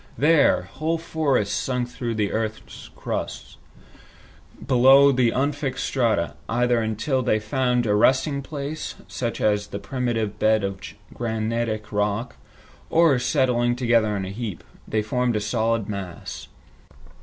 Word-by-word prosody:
There, 150 0 +4
whole 160 +2 -2
forests 145 -10 0
sunk 125 -2 -1
through 120 -2 -4
the 105 -2 0
earth's 110 0 -5
crust, - - -5 1.1
below 135 +3 +6
the 125 -3 +3
unfixed 140 +1 -1
strata, 110 -10 0 0.2
either 120 0 +2
until 110 +5 -1
they 120 -3 +2
found 125 +2 0
a 105 - +2
resting 130 +6 +3
place, 145 +2 -5
such 120 -2 -4
as 105 -1 +1
the - - -6
primitive 110 -1 -2
bed 110 -1 +3
of 100 -1 -3 0.3
granitic 110 -1 -2
rock, 105 +3 -1 0.5
or, 160 -5 +4
settling 125 -2 +1
together 115 -4 +2
in 95 - -3
a 95 - -6
heap, 105 -4 -5 0.2
they 110 -1 0
formed 125 +2 0
a - - +1
solid 115 0 0
mass. 100 -4 -6
120 Hz, 130 wpm, -24 LUFS, 110-130 Hz, 1.1 s, below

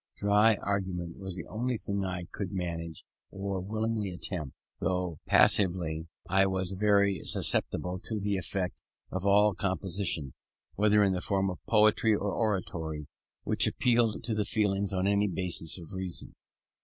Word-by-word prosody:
Dry 105 +2 +4
argument 95 -4 -3
was 95 -2 -6
the 85 - -6
only 120 +2 -2
thing 100 -1 -3
I 90 -2 -3
could, 100 -4 -4
manage, 85 -3 -4 0.2
or 95 0 -3
willingly 110 +1 -2
attempted; 90 -5 -5 0.2
though 90 -4 -1
passively 85 -4 +3 0.2
I 95 +1 +3
was 95 -1 -1
very 100 0 +2
susceptible 90 +1 0
to 110 -2 -1
the 100 0 0
effect 95 -1 -3 0.3
of 95 +1 -2
all 105 +1 +5
composition, 95 -7 -2 0.4
whether 105 0 +4
in 95 -1 +3
the 90 - -2
form 95 0 0
of 90 - -10
poetry 110 0 +4
or 100 -1 -2
oratory, 85 -8 -2 0.4
which - - +4
appealed 120 -3 +2
to 115 - -1
the 105 -1 +1
feelings 100 -1 0
on 95 -1 0
any 100 +1 +3
basis 85 -3 -2
of 85 +1 -11
reason. 95 -2 -3
95 Hz, 150 wpm, -30 LUFS, 90-105 Hz, 0.4 s, all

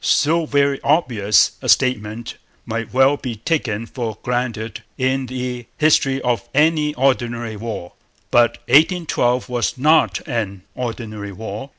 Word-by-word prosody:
So 160 +3 +2
very 140 -1 +1
obvious 120 -10 +3
a - - -4
statement 115 -1 +1 0.3
might 115 -1 -4
well 135 +3 +4
be 125 -5 -5
taken 115 -3 -2
for 115 -3 -5
granted 120 -4 -3 0.2
in 130 0 0
the 125 -1 -5
history 140 -3 +3
of 120 -1 -1
any 150 0 +2
ordinary 120 -4 0
war. 105 -5 -6 0.4
But 120 -1 +4
'1812' 145 -4 +2
was 125 +1 -1
not 155 +5 +3
an 100 -5 -3
ordinary 110 -4 -5
war. 110 +6 -7
125 Hz, 125 wpm, -20 LUFS, 115-135 Hz, 0.4 s, well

